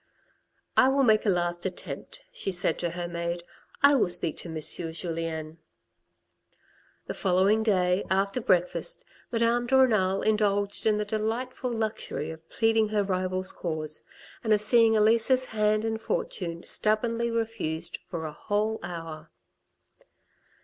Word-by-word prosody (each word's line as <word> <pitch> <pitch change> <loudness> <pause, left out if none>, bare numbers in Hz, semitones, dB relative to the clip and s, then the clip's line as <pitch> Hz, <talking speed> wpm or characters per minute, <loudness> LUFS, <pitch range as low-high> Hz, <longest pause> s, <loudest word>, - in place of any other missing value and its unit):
" - - -48 0.3
I 260 - +7
will 270 +1 +3
make 220 -3 +3
a - - +5
last 175 -1 0
attempt," 190 - -6
she 485 - -3
said 180 -1 0
to 175 - -1
her 175 +1 -4
maid. 170 0 -3 0.2
" - - -28
I 285 +1 +8
will 260 -9 +3
speak 175 -3 0
to 175 - -7
M. 160 -1 -4
Julien." 165 -1 -3 1.5
The - - -4
following 195 +3 +2
day, 185 -3 +2
after 195 +5 +1
breakfast, 185 - +1 0.3
Madame 235 +1 +1
de 265 +2 +4
Renal 195 -7 +3
indulged 205 -1 +1
in 215 -1 +3
the 210 - -1
delightful 230 +4 -2
luxury 220 -8 -3
of 160 0 -13
pleading 225 -1 +2
her 210 -1 +1
rival's 185 -1 +1
cause, 155 -3 -4 0.4
and 220 -2 +3
of 210 - +3
seeing 225 0 +6
Elisa's 230 +4 +4
hand 215 -1 +1
and 225 0 -2
fortune 205 - -3
stubbornly 230 +2 0
refused 225 -9 -3
for 165 -3 -4
a 155 - -5
whole 210 +6 -1
hour. 165 -2 -7
205 Hz, 145 wpm, -27 LUFS, 175-225 Hz, 1.5 s, I